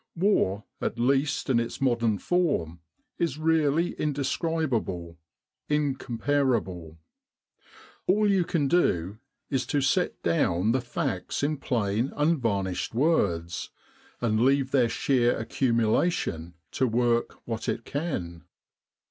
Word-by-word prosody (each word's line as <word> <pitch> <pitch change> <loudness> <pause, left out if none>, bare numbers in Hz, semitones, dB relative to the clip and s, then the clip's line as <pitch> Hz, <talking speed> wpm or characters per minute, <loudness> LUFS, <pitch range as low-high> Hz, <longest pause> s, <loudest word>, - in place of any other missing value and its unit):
War, 165 - +1 0.2
at - - -2
least 135 +3 +1
in 125 -3 +3
its 115 0 -4
modern 115 -5 +1
form, 140 - 0 0.4
is 170 -3 0
really 160 +1 +2
indescrib 150 +1 -1
able, 85 -6 -3 0.5
incomparable. 130 - -1 1.1
All 210 +3 +3
you 195 -3 +3
can 160 -4 0
do 105 - +1 0.3
is 135 -2 +1
to 145 - +1
set 140 +7 +1
down 100 - +2
the 130 +2 +1
facts 120 -3 -3
in 150 +1 0
plain 115 -2 -1
unvarnished 115 - 0
words, 95 - +1 0.5
and 110 -2 +1
leave 135 +1 +3
their 125 -4 +3
sheer 120 -1 +2
accumulation 110 - 0 0.2
to 130 - +1
work 120 0 +1
what 115 -1 -3
it 115 - -3
can. 90 - -4
125 Hz, 115 wpm, -27 LUFS, 105-150 Hz, 1.1 s, in